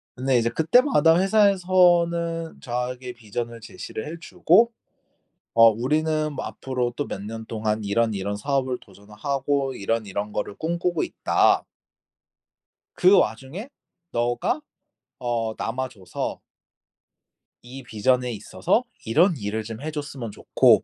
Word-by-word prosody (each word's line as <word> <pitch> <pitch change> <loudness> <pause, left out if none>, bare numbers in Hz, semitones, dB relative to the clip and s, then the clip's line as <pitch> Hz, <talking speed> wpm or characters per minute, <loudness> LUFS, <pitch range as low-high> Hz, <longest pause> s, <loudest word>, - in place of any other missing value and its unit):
근데 130 0 +1
이제 115 0 +2
그때마다 165 - +4
회사에서는 175 -4 +3
저에게 125 +1 -4
vision을 115 0 -5
제시를 110 +1 -7
해주고 180 +6 +3 0.8
어 115 0 +8
"우리는 155 +6 0
뭐 - - -4
앞으로 125 -2 -3
또 145 - -3
몇 95 - -5
년 110 +2 -7
동안 110 -1 -2
이런이런 100 -1 0
사업을 130 +1 -1
도전을 100 +1 -17
하고 140 +1 0
이런이런 105 -1 -2
거를 105 -1 -3
꿈꾸고 170 +1 -1
있다." - - +2 1.3
그 185 +2 +6
와중에 135 - -1 0.4
너가 120 - 0 0.6
어 115 -3 -1
남아줘서... 125 -5 -4 1.2
"이 130 +2 -10
vision에 125 +3 +1
있어서 105 - 0 0.2
이런 165 - +4
일을 105 0 -3
좀 115 +3 -7
해줬으면 145 -7 -5
좋고 - - +4
125 Hz, 280 characters per minute, -24 LUFS, 115-160 Hz, 1.3 s, 어